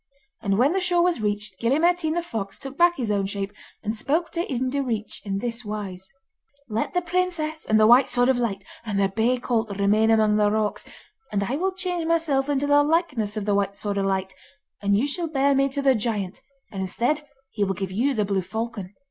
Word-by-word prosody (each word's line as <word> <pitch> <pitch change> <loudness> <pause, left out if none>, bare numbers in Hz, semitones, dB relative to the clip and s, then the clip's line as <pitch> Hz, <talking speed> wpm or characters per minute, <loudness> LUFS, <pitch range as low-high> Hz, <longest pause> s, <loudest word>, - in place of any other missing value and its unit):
And 195 -1 0
when 260 +6 +4
the 385 - +1
shore 355 -1 +2
was 350 -9 +1
reached, 205 -2 -2
Gille 235 +5 +2
Mairtean 335 -1 +2
the 345 - 0
fox 220 - -5
took 270 0 -8
back 345 +2 +4
his 235 -5 -1
own 200 -1 0
shape, 200 0 -4 0.3
and 215 +1 -2
spoke 315 +8 0
to 340 -2 -3
Ian 255 0 -1
Direach 245 -6 -2
in 195 -1 -2
this 235 +2 -3
wise: 200 -3 -6 0.6
'Let 225 +8 -2
the 355 - +2
princess 340 -3 -1
and 220 0 +4
the 215 - +6
White 245 +4 +6
Sword 245 0 +3
of 260 -2 +3
Light, 200 -5 -2 0.2
and 210 -3 -2
the 195 -1 +3
bay 225 +5 +1
colt, 225 -5 -1
remain 210 +2 +3
among 215 -1 +4
the 210 -1 +4
rocks, 215 0 -1 0.5
and 200 -1 0
I 240 +7 -2
will 375 +6 0
change 360 -3 -2
myself 305 -5 +1
into 285 0 +1
the 290 0 +5
likeness 290 - 0
of 210 - -2
the 205 - +1
White 200 0 0
Sword 200 -1 -2
of 195 - 0
Light, 190 -1 -1 0.5
and 200 0 +2
you 235 - +2
shall 330 +4 -1
bear 280 -2 +2
me 275 0 +2
to 280 +1 -3
the 270 -1 +5
giant, 210 -5 -2 0.3
and, 195 - -4
instead, 240 +11 -1 0.3
he 210 - -1
will 195 -1 0
give 190 0 -4
you 255 +8 +1
the 210 -2 +1
blue 195 -1 0
falcon. 215 -1 -5
230 Hz, 225 wpm, -24 LUFS, 205-290 Hz, 0.6 s, the